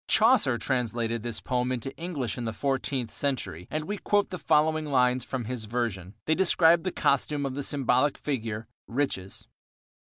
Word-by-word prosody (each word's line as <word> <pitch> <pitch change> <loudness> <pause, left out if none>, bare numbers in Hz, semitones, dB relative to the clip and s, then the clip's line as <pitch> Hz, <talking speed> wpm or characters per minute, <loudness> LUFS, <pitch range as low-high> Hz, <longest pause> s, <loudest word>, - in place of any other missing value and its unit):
Chaucer 220 - +4
translated 115 -3 -1
this 115 -1 -4
poem 125 0 -1
into 130 +1 -4
English 155 - -3
in 120 - -4
the 115 - -2
fourteenth 130 0 -1
century 130 - -2
and 155 0 -3
we 205 +2 -4
quote 205 -1 +1
the 180 - -4
following 155 0 +2
lines 125 -2 +3
from 125 -2 -4
his 120 -1 -4
version. 110 -5 -3
They 160 - +3
describe 170 -1 +5
the 185 - -2
costume 140 0 +1
of 135 - -2
the 140 - -3
symbolical 135 0 +1
figure, 115 -6 -3 0.2
Riches. 115 -7 -2
130 Hz, 165 wpm, -27 LUFS, 115-150 Hz, 0.2 s, describe